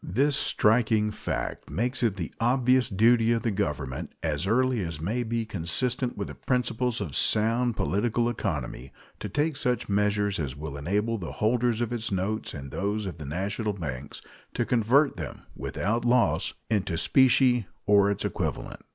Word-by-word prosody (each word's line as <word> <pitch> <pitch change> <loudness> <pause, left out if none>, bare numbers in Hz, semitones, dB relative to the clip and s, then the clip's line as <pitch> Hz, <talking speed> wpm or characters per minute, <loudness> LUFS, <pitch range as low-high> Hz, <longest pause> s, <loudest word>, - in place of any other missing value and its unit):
This 140 - +1
striking 110 -4 +2
fact - - -4
makes 120 - -1
it 115 -5 +2
the 85 -5 -5
obvious 125 +1 +3
duty 115 +3 +4
of 115 - -1
the 115 - +1
Government, 75 -9 -3
as 80 +2 -1
early 130 +2 +2
as 85 -4 -4
may 105 +10 -1
be 115 -1 -2
consistent 120 +7 -1
with - - -3
the - - -7
principles 125 -1 -1
of - - -4
sound 115 +2 +2
political 115 +4 0
economy, 75 - -3 0.3
to - - -5
take 150 +1 0
such 125 -4 -1
measures 105 -1 +1
as 70 -4 -3
will 75 -1 -6
enable 105 +10 -1
the 85 - -6
holders 120 +1 +1
of 120 0 -1
its 115 -2 -3
notes 100 +2 -2
and 70 -2 -7
those 105 +1 -2
of 90 -5 -6
the 75 - -6
national 100 +8 -2
banks 70 -7 -6 0.3
to - - 0
convert 125 +5 +3
them, - - -7
without 115 +3 -2
loss, 120 0 +2
into 100 -6 0
specie 125 0 +4 0.2
or 100 -1 +5
its 100 - -2
equivalent. - - -3
110 Hz, 165 wpm, -27 LUFS, 95-120 Hz, 0.3 s, or